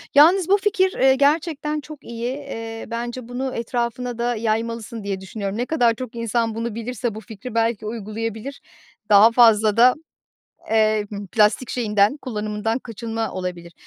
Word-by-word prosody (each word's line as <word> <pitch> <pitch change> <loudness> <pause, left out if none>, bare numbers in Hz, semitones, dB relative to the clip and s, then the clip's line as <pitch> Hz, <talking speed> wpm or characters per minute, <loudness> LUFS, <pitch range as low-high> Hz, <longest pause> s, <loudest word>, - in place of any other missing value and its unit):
Yalnız 335 +5 +6
bu 400 - +6
fikir, 385 -2 +2
eee, 265 0 +5
gerçekten 300 +1 +1
çok 300 -1 -12
iyi, 235 +3 -4
iii, 225 -5 -7
bence 240 +1 -4
bunu 255 +1 -4
etrafına 235 +1 -3
da 240 0 0
yaymalısın 225 0 -2
diye 195 -1 -3
düşünüyorum. 200 +1 -5
Ne 245 - -1
kadar 245 -7 +2
çok 245 -1 -7
insan 230 -1 -1
bunu 230 -1 -3
bilirse, 230 -1 -3
bu 220 - -7
fikri 225 +2 -9
belki 230 -2 0
uygulayabilir. 225 +4 -5 0.5
Daha 210 +3 +7
fazla 220 -3 +5
da, 250 +2 +7 0.8
eee, 215 -1 +3 0.3
plastik 215 +3 +3
şeyinden 210 +1 +2
kullanımından 215 -1 -3
kaçınma 225 -1 -4
olabilir 175 -2 -6
230 Hz, 145 wpm, -22 LUFS, 215-250 Hz, 0.8 s, Daha